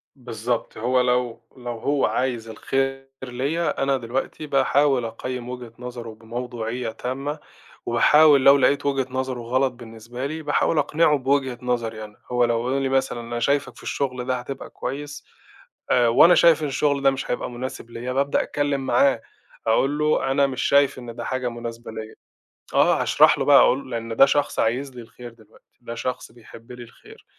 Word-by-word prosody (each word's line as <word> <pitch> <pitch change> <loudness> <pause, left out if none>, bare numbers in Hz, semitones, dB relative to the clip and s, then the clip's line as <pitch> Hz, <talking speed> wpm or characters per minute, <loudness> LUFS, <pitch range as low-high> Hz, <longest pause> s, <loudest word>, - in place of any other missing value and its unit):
بالضبط، 120 -2 -4
هو 125 +3 +1
لو 125 -2 0 0.2
لو 120 -1 -6
هو 140 +3 +1
عايز 120 -3 -2
الخير 135 +4 -2 0.2
ليّا، 135 +7 -2
أنا 135 0 +1
دلوقتي 130 +5 -4
باحاول 135 -2 +2
أقيّم 125 +2 -6
وجهة 125 -2 -7
نظرُه 120 -2 -7
بموضوعية 120 +1 -5
تامة، 135 +6 -4 0.5
وباحاول 145 +4 +5
لو 140 +1 +8
لقيت 140 +1 +2
وجهة 135 -2 0
نظرُه 130 -1 -3
غلط 130 +3 0
بالنسبة 120 +1 -8
لي، 155 +3 -4
باحاول 150 +2 +1
أقنعه 150 0 +3
بوجهة 135 -1 0
نظري 115 -3 -2
أنا، 105 -1 -12
هو 125 0 +3
لو 120 +1 -1
يقول 135 +1 0
لي 135 - 0
مثلًا 130 -2 0
"أنا 120 0 -5
شايفك 140 0 0
في - - -15
الشغل 130 -3 -3
ده 130 0 0
هتبقى 135 +2 -7
كويس." 145 +3 -6 0.7
آآ، 120 -1 +4
وأنا 165 +10 +6
شايف 165 -2 +5
إن - - 0
الشغل 140 0 0
ده 135 - +5
مش 135 - -4
هيبقى 125 - -2
مناسب 120 -1 -7
ليّا 125 +2 -5
بابدأ 140 +2 +1
أتكلم 145 -2 -1
معاه 125 -1 +3 0.5
أقول 135 +6 +2
له: 150 -3 +1
"أنا 140 0 +3
مش 130 -2 -4
شايف 140 -2 +3
إن 120 -2 -9
ده 120 - -6
حاجة 130 -1 -2
مناسبة 120 -1 -7
ليّا." 110 0 -8 0.6
آه، - - +3
هاشرح - - +4
له - - 0
بقى - - +7
أقول 130 0 +2
لأن 115 -1 -4
ده 135 - +7
شخص 145 +1 0
عايز 125 +4 -1
لي 120 - -8
الخير 120 +1 -12
دلوقتي، 110 -2 -24
ده 115 -1 -7
شخص 125 +2 -4
بيحب 115 0 -15
لي 125 0 -9
الخير 115 - -17
125 Hz, 175 wpm, -23 LUFS, 120-140 Hz, 0.7 s, لو